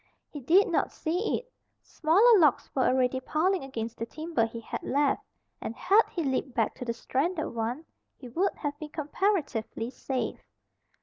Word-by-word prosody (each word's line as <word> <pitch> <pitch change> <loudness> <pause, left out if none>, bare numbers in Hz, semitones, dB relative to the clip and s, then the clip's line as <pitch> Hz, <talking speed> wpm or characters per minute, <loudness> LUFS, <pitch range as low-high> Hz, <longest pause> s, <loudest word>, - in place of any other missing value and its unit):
He 295 - -6
did 345 +10 +4
not - - 0
see 355 +7 -1
it. - - -12 0.3
Smaller 400 +8 +4
logs 300 -6 +3
were 260 - +2
already 255 0 +2
piling 330 +6 0
against 230 -4 -5
the 230 - -3
timber 310 -7 -1
he 230 +1 -7
had 230 - -6
left, 285 +1 +1 0.4
and 230 - -5
had 400 - +5
he 340 - -3
leaped 265 -2 -1
back 225 -3 +1
to 250 - -6
the 235 - -1
stranded 305 +8 -1
one 235 +7 -3 0.3
he 255 - -10
would 350 +12 0
have 290 -1 -4
been 305 - -6
comparatively 295 - -1
safe. 260 -1 -3
285 Hz, 170 wpm, -28 LUFS, 245-340 Hz, 0.4 s, had